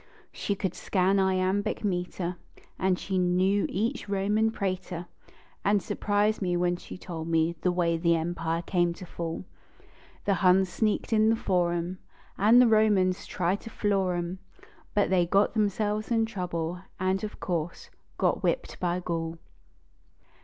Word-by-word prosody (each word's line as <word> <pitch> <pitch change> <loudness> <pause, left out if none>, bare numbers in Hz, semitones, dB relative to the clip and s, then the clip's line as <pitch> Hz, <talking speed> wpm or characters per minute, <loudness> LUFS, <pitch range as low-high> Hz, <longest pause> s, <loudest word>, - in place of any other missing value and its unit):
She 200 - -2
could 190 -2 -2
scan 190 +1 +1
iambic 190 +3 +1
meter 180 -2 -2 0.4
And 185 -1 +2
she 190 0 -2
knew 185 +3 +2
each 225 +3 -2
Roman 205 +3 +2
praetor. 185 -4 -3 0.6
And 205 0 +3
surprised 205 +3 0
me 180 -2 +1
when 175 0 +1
she - - -10
told 165 -3 -6
the 165 +2 +1
way 170 -2 +1
the 170 0 +3
empire 165 0 -2
came 175 -1 +1
to 185 - -10
fall. 170 +1 -5 0.8
The 200 - +3
Huns 185 0 +5
sneaked 220 +3 0
in 215 0 +4
the 225 - +4
forum, 175 -3 0 0.4
And 220 +5 +6
the 250 - +7
Romans 205 -4 +3
tried 185 +3 -1
to - - -8
floor 195 -4 0
em 175 +2 -3 0.6
But 205 -2 +2
they 175 -2 +3
got 200 +4 +3
themselves 210 0 0
in 225 -2 +2
trouble, 180 -5 -3 0.2
and, 185 +2 0
of 210 - -5
course, 170 -2 -3 0.3
got - - +1
whipped, - - -1
bv 180 0 -1
Gaul. 165 -1 -2
185 Hz, 145 wpm, -28 LUFS, 175-205 Hz, 0.8 s, the